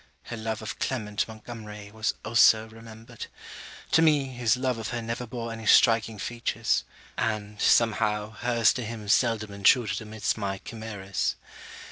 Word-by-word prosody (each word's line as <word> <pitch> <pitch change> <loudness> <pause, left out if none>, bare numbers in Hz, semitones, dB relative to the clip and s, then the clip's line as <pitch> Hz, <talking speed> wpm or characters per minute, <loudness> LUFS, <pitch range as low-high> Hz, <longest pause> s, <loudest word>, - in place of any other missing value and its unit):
Her 120 - -6
love 110 -1 -4
of 110 - -6
Clement 105 -5 -2
Montgomery, 110 -2 -9
was 110 0 -1
also 110 -1 +5
remembered. 115 +1 -11 0.6
To 160 - +5
me, 150 -4 +3
his 125 -2 +1
love 130 -2 -1
of 110 - -4
her 120 - -3
never 115 +2 -4
bore 115 0 -5
any 115 -1 -7
striking 115 -1 +5
features; 115 +1 -1 0.4
and, 105 -2 -2
somehow, 105 -2 +2
her's 115 +1 +2
to 125 - -4
him 110 -1 -7
seldom 110 -1 +2
intruded 100 +2 +3
amidst 110 0 -2
my 100 -1 -2
chimeras. 100 -3 -4
110 Hz, 145 wpm, -27 LUFS, 105-115 Hz, 0.6 s, also